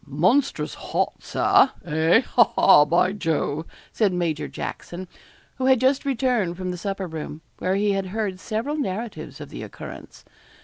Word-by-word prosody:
'Monstrous 185 - +1
hot, - - -2
Sir 270 - +3
hey? 160 +4 +3
ha, 240 -2 +4
ha, 150 -6 +7
by 175 +4 +3
Jove!' 160 -4 -1 0.3
said 210 -4 +2
Major 170 -4 -1
Jackson, 180 +2 -6 0.5
who 260 - 0
had 260 -2 +5
just 265 +3 +2
returned 245 -9 0
from 185 -1 -3
the - - -4
supper 195 0 -3
room, 160 -2 -7 0.2
where 185 +1 0
he 205 +1 +2
had 195 -1 -1
heard 200 -1 -3
several 230 +10 -3
narratives 225 -4 -4
of - - -8
the - - -8
occurrence. - - -10
190 Hz, 160 wpm, -24 LUFS, 170-235 Hz, 0.5 s, ha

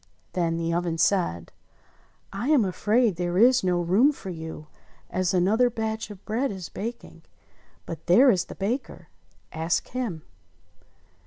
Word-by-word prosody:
Then 165 -2 0
the 165 0 -1
oven 170 -1 -1
said, 165 - +1 0.8
"I 200 +6 -3
am 280 -9 +4
afaid 210 +2 +1
there 175 0 -1
is 250 +3 +5
no 180 -1 +1
room 195 - +4
for 195 -9 -8
you, 160 -2 -7 0.5
as 185 -1 0
another 205 +7 +3
batch 220 -1 -3
of 205 -2 -12
bread 245 +5 -1
is 185 -4 -7
baking; 235 +4 -7 0.6
but 165 - -8
there 250 +10 +7
is 185 -5 0
the - - -10
baker 230 +8 -4 0.3
— - - -36
ask 160 +2 -1
him." 230 -11 -4
190 Hz, 150 wpm, -25 LUFS, 175-230 Hz, 0.8 s, there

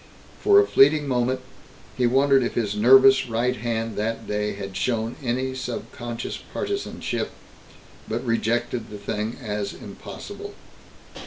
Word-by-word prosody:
For 405 -1 +6
a 410 - +5
fleeting 145 - +5
moment, 130 0 0 0.5
he 125 -2 +2
wondered 135 +2 +4
if 120 - -2
his 105 -4 0
nervous 130 +4 +6
right 120 +3 +1
hand 115 -2 -2
that 115 +1 -2
day 105 0 -1
had 100 -1 -7
shown 115 0 -1
any 130 +2 -1
subconscious 120 -2 -5
partisanship, 400 0 -3 0.8
but - - -3
rejected 115 0 -1
the 105 - -7
thing 105 +2 -3
as 105 -4 -3
impossible. - - -9
120 Hz, 130 wpm, -24 LUFS, 110-130 Hz, 0.8 s, For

